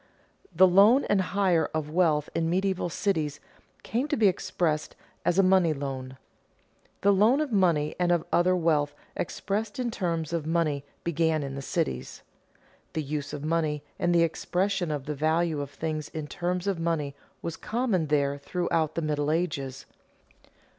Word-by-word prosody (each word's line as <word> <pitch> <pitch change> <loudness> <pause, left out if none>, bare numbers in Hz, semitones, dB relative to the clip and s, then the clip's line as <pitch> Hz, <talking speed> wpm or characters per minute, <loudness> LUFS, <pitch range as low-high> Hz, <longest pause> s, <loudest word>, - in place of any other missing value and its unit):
The 185 +2 +6
loan 205 +9 +6
and 200 -2 +4
hire 185 -4 +1
of 150 -1 -2
wealth 155 -4 +2
in 165 0 0
medieval 190 0 0
cities 155 -6 -1 0.4
came 245 +6 -1
to 295 - -1
be 215 -3 +5
expressed 175 -4 -1 0.3
as 175 - +1
a 195 - +6
money 185 -3 +4
loan. 135 -2 -5 0.8
The 200 - +5
loan 215 +8 +4
of 305 -4 -1
money 170 -7 +2
and 175 -1 +2
of 175 -2 +1
other 180 +1 +4
wealth 150 -4 +1 0.2
expressed 205 +4 -3
in 245 -2 -1
terms 170 -6 -2
of 160 -2 -2
money, 160 -4 0 0.2
began 160 -2 +1
in 135 -1 -5
the 140 - -5
cities. 65 - -3 0.7
The 155 - -2
use 145 0 -4
of 150 0 -5
money 155 -2 0 0.2
and 175 - +2
the 170 - +5
expression 180 +2 -1
of 145 -3 -3
the 150 - -2
value 155 +1 +1
of 140 - -5
things 155 0 -4
in 155 -2 -5
terms 175 +4 -2
of 195 -4 -1
money 165 -4 -1 0.3
was 165 - -3
common 220 -8 -1
there 140 -1 +1
throughout 160 0 -1
the 165 - -1
Middle 150 -1 0
Ages. 140 -5 -2
165 Hz, 165 wpm, -27 LUFS, 150-185 Hz, 0.8 s, The